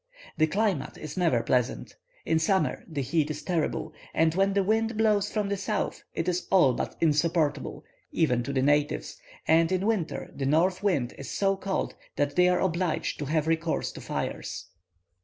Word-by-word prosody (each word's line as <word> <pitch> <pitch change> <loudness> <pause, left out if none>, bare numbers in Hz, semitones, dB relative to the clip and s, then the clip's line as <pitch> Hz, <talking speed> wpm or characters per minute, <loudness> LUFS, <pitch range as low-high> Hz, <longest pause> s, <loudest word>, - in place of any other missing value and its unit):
The 155 - +3
climate 190 -4 -1
is 155 - -7
never 165 -11 +2
pleasant; 125 0 0 0.3
in 160 - +2
summer 190 +4 +1
the 150 -5 -3
heat 150 +3 0
is 155 - -5
terrible, 160 -2 -1 0.2
and 160 0 +3
when 195 +2 +2
the 200 0 +2
wind 220 +2 +1
blows 210 -2 +2
from 210 -2 -1
the 200 0 -1
south, 195 - -2
it - - -2
is 180 0 -1
all 175 -9 +5
but - - -3
insupportable, 160 0 +1 0.3
even 125 -7 +2
to 140 - -4
the 130 -1 +1
natives, 145 - +1 0.3
and 165 +2 +4
in 185 +1 0
winter 210 -7 -1
the 135 - -2
north 180 +6 +2
wind 170 -12 0
is 140 - -7
so 195 -1 +1
cold 195 0 -2 0.2
that 145 0 0
they 180 0 +5
are 180 0 +2
obliged 175 -2 -1
to 145 - -2
have 155 +1 0
recourse 165 0 0
to - - -10
fires. - - -4
165 Hz, 180 wpm, -27 LUFS, 150-190 Hz, 0.3 s, all